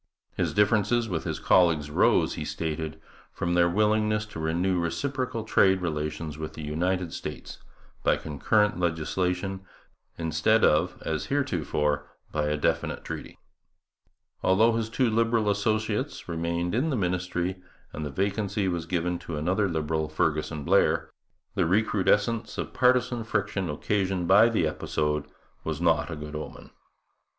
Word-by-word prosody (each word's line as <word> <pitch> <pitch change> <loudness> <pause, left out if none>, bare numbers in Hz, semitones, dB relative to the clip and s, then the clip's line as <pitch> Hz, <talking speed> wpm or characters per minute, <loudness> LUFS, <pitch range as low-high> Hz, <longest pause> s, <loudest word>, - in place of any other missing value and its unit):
His - - -1
difference 105 0 +3
with 115 -9 0
his - - -3
colleagues 80 -5 +3
arose, - - +3
he - - -4
stated, 80 -1 -4 0.3
from 85 - -2
their 85 0 +4
willingness 105 +2 +2
to - - -6
renew 85 +3 0
reciprocal 125 +6 -2
trade 95 -3 +4
relations 75 -2 -3
with 80 -1 -5
the 80 - -8
United 90 +3 -1
States - - -7 0.4
by - - +3
concurrent 105 +7 +1
legislation 90 +3 -1 0.5
instead 80 +8 +2
of, 80 +4 +2
as 80 -1 -2
heretofore, 75 - 0 0.2
by 75 -1 0
a 75 0 0
definite 75 - -1
treaty. - - -7 1.0
Although 105 +5 +4
his 115 -1 -1
two 125 +2 +1
Liberal 115 -1 +2
associates 110 +5 -1
remained 85 +1 -2
in 130 +8 +1
the 140 - 0
ministry, 90 -1 -1 0.3
and 75 - -5
the 75 - -3
vacancy 100 +5 -1
was 85 -2 -2
given 90 0 -1
to 80 - -6
another 95 +6 +1
Liberal, 80 -1 -1
Fergusson 75 -1 -1
Blair, - - +2 0.4
the - - +1
recrudescence 105 +3 +1
of - - -4
partisan 125 -2 +2
friction 105 -4 -1
occasioned 95 +3 -1
by 100 +5 +7
the 110 -8 +1
episode 75 -1 -1 0.4
was 80 -1 -3
not 80 -1 +2
a 85 - -4
good 75 0 -7
omen. 75 - -8
90 Hz, 140 wpm, -27 LUFS, 80-105 Hz, 1.0 s, by